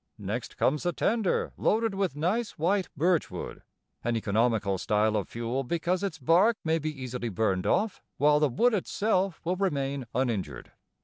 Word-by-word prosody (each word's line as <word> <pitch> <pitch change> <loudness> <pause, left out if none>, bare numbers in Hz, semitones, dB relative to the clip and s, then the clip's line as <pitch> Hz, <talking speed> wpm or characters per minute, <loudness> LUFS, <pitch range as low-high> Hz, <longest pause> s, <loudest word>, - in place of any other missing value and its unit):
Next 110 +4 -5
comes 150 +2 +2
the 175 0 -1
tender 220 0 0
loaded 225 0 +1
with 195 -7 -1
nice, 195 +10 -1
white 185 +4 +1
birch 170 +2 +2
wood, - - -7 0.4
an 120 0 0
economical 105 -2 +1
style 105 +2 +1
of 105 - -1
fuel 120 +3 -2
because 170 +6 -1
its 195 -4 -3
bark 175 - +4
may 160 0 +1
be 155 0 -2
easily 125 -1 -4
burned 95 -3 0
off 215 -1 +1 0.2
while 150 +1 +4
the 150 -1 +3
wood 235 - +2
itself 195 -2 0
will 180 +2 -1
remain 140 -8 -1
uninjured. 110 - -2
150 Hz, 165 wpm, -28 LUFS, 115-185 Hz, 0.4 s, bark